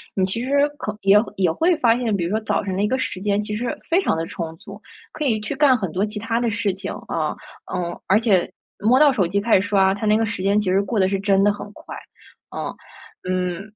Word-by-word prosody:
你 190 - +2
其 230 +6 -2
实 260 - -4 0.3
可 210 -8 -4
也 195 +1 +6 0.2
也 185 -4 +2
会 335 - +2
发 235 -5 +3
现， 230 -4 0
比 180 - -1
如 175 - -3
说 220 - +1
早 215 - -1
上 190 -2 -3
那 205 +2 +1
个 260 +3 0
时 185 -7 -4
间 205 +1 +1
其 210 0 -4
实 235 +2 -3
非 345 +4 +3
常 375 - +1
地 165 - -2
充 165 -1 -6
足， 200 +4 -12 0.3
可 305 - -5
以 225 -6 +1
去 215 +7 -4
干 275 -3 +4
很 190 -8 -4
多 190 +5 0
其 210 0 -5
它 225 +2 -1
的 240 -1 0
事 205 -2 -1
情， 195 +1 -6 0.2
啊。 155 -2 -2 0.4
嗯， 175 -1 -3
而 200 +3 +4
且 205 -6 +2 0.3
摸 245 +6 +4
到 295 -2 +6
手 205 -8 +1
机 200 +4 0
开 225 +3 +3
始 - - 0
刷， 195 -2 +3
它 215 +2 -4
那 215 +1 +4
个 225 - +1
时 210 -3 -4
间 200 +2 +3
其 210 - -1
实 190 +2 +3
过 205 +1 -2
得 190 - +4
是 195 0 -1
真 195 0 +2
的 205 - +4
很 205 0 -8
快， - - -10 0.6
嗯。 - - -4 0.5
嗯 185 0 -2
205 Hz, 275 characters per minute, -22 LUFS, 190-225 Hz, 0.6 s, 也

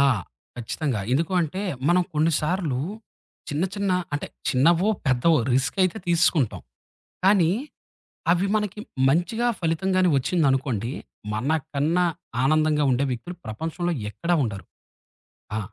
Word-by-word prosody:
ఆ! - - +6 0.5
ఖచ్చితంగా. 120 0 -2
ఎందుకు 165 +6 +1
అంటే, 180 +5 -2 0.3
మనం 180 +1 +4
కొన్నిసార్లు, 155 -2 +1 0.7
చిన్న 150 +5 0
చిన్న 200 -1 -1 0.2
అంటే 145 - -2 0.2
చిన్నవో, 165 +9 +3 0.2
పెద్దవో 135 +5 +4 0.2
రిస్క్ 130 +8 0
అయితే 185 +4 -1
తీసుకుంటాం. 165 - +2 0.6
కానీ, 190 -4 +5 0.8
అవి 180 +3 +1
మనకి 210 0 -2 0.3
మంచిగా 180 - +1
ఫలితం 165 +3 0
గాని 185 -1 +4
ఒచ్చిందనుకోండి. 135 - 0 0.4
మనకన్నా 155 +6 0 0.4
ఆనందంగా 155 0 +3
ఉండే 130 +3 +2
వ్యక్తులు 175 +9 -5
ప్రపంచంలో 165 +10 -3 0.2
ఎక్కడ 170 +10 -5
ఉండరు. 100 -4 -5 0.9
ఆ! - - 0
160 Hz, 110 wpm, -24 LUFS, 135-180 Hz, 0.9 s, ఆ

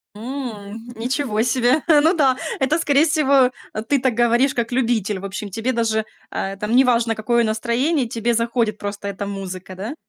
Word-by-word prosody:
М, 225 -2 -7
ничего 240 -1 -1
себе. 250 +4 +2
Ну 315 +2 +5
да, 270 -5 +3 0.2
это, 275 +4 +2
скорее 295 -1 +3
всего, 280 -5 +4 0.4
ты 285 -2 +3
так 255 -2 +1
говоришь 240 +3 +2
как 235 0 -2
любитель. 225 -6 0
В 195 - -7
общем, 200 +1 -5
тебе 225 +6 -2
даже, 220 -2 0 0.2
э, 195 0 -3
там 210 +4 -1
неважно, 240 -3 +3
какое 235 +2 +1
настроение, 240 +6 0
тебе 230 +1 -1
заходит 230 -2 0
просто 205 0 -5
эта 200 0 -4
музыка, 190 -2 -6
да? 215 +10 -6
235 Hz, 165 wpm, -21 LUFS, 215-260 Hz, 0.4 s, Ну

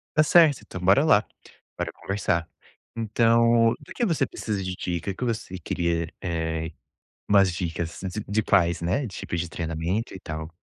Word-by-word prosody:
Tá 155 - +6
certo, 155 -3 +5
então, 90 - -8
bora 100 - +5
lá, 105 -9 +5 0.5
bora - - -2
conversar. 90 -4 -1 0.5
Então, 115 +1 +4
do - - -12
que 240 - +1
você 155 - +1
precisa 105 -3 -3
de 95 -1 -3
dica 90 +1 -3
o - - -8
que - - -5
você 110 -6 -3
queria? 85 -1 -2
Eh, 80 -2 -2 0.6
umas 100 -2 +5
dicas 85 -1 -4
de 95 +2 -4
de 105 +2 +1
quais, 85 -5 +3
né? 100 +11 0
Tipo 95 -3 -5
de 85 +1 -2
treinamento 85 +7 -3
e - - -8
tal? 80 -2 -6
95 Hz, 170 wpm, -25 LUFS, 85-115 Hz, 0.6 s, Tá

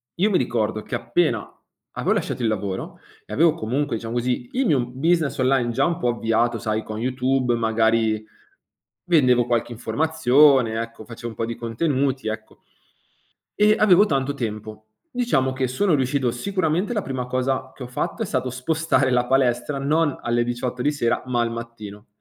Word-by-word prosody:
io 195 +5 +2
mi 180 - +3
ricordo, 110 -3 -1
che - - -5
appena 120 -1 0 0.5
avevo - - +1
lasciato - - -2
il 115 - +1
lavoro 100 -3 -3 0.2
e - - -16
avevo, 160 +5 +4
comunque, 125 +2 -2
diciamo, 115 +1 -6
così 120 0 -1
il 265 +1 +1
mio 140 - +3
business 155 +3 0
online, 130 -2 +2
già - - +1
un 170 0 -1
po' 125 - 0
avviato, 120 0 +1
sai, 110 -1 -2
con 110 - -6
YouTube 130 0 0
magari 110 -1 +1 0.8
vendevo 125 -8 +4
qualche 120 0 0
informazione, 135 -3 +3
ecco, 115 -1 -8
facevo 120 +1 -7
un 110 - -10
po' 115 - -2
di 115 0 -4
contenuti, 130 +1 -1
ecco. 110 0 -7 1.0
E 210 +1 +5
avevo 200 -1 +6
tanto 140 -6 0
tempo. 110 -4 -6 0.3
Diciamo 235 - +1
che, 130 0 -1
sono 170 +9 +1
riuscito 130 -2 +1
sicuramente, 185 - -1
la 210 - -1
prima 130 -2 -4
cosa 130 +1 -1
che 130 - -8
ho - - -6
fatto, 125 - -3
è - - -2
stato 130 - -2
spostare 130 +1 0
la 125 0 +2
palestra, 130 +1 +1
non 145 +2 +1
alle 120 0 +1
18 120 +1 -3
di 145 - +2
sera, 135 -6 0
ma 120 -2 +1
al 115 0 -1
mattino. 115 -3 -8
125 Hz, 175 wpm, -23 LUFS, 115-145 Hz, 1.0 s, avevo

